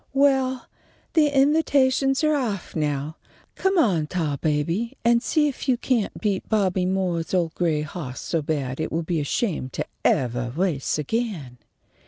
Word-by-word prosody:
"Well, 265 -2 +2 0.5
the 315 -3 +5
invitations 275 -1 +3
are 305 0 +3
off 230 -10 -2
now. 150 0 -2 0.4
Come 385 0 0
on, 180 - +3
Tarbaby, 165 - -1
and 235 0 +4
see 300 +4 +2
if 275 -1 -4
you 250 - +4
can't 235 -4 -1
beat 205 -3 -1
Bobby 190 -4 +1
Moore's 185 -2 -1
old 170 -3 +1
gray 160 -4 0
hawse 145 -4 -6
so 165 - -1
bad 140 -3 -2
it 160 - -2
will 165 +1 -1
be 165 0 -1
ashamed 150 - -2
to - - -2 0.2
evah 120 -1 +1
race 170 -8 0
again." 150 - -3
185 Hz, 150 wpm, -24 LUFS, -, 0.5 s, the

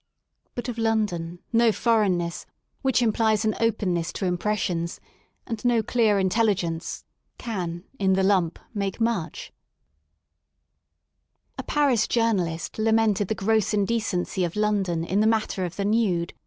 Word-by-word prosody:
But 245 -1 -4
of 240 -2 -4
London 210 -7 0 0.2
no 230 0 +5
foreign 215 -5 +2
ness, 170 0 -4 0.3
which 265 -2 +2
21 230 -2 +3
THE - - -11
SOUL - - -1
OF - - +4
LONDON 215 0 +4
implies 215 - -2 0.2
an 230 - +5
openness 180 -6 -1
to 195 - -3
impressions^ 175 -3 -2 0.2
— - - -43
and 225 -3 -5
no 240 -2 +3
clear 220 -2 +2
in 190 -1 +2
telligence, 185 -6 -1 0.3
can, 180 -7 -4 0.2
in 190 -1 +3
the 190 0 +2
lump^ 185 -4 +2 0.2
make 200 -1 -3
much. 225 -8 -2 2.1
A - - 0
Paris 275 -7 +2
journalist 190 -8 0
lamented 220 -2 +2
the 220 - -1
gross 215 0 +1
indecency 205 -3 0
of 170 -1 -2
London 200 -6 0
in 190 +4 0
the 215 - +4
matter 215 -4 0
of 175 - -6
the 200 - -2
nude. 200 -6 +1
210 Hz, 160 wpm, -25 LUFS, 180-225 Hz, 2.1 s, no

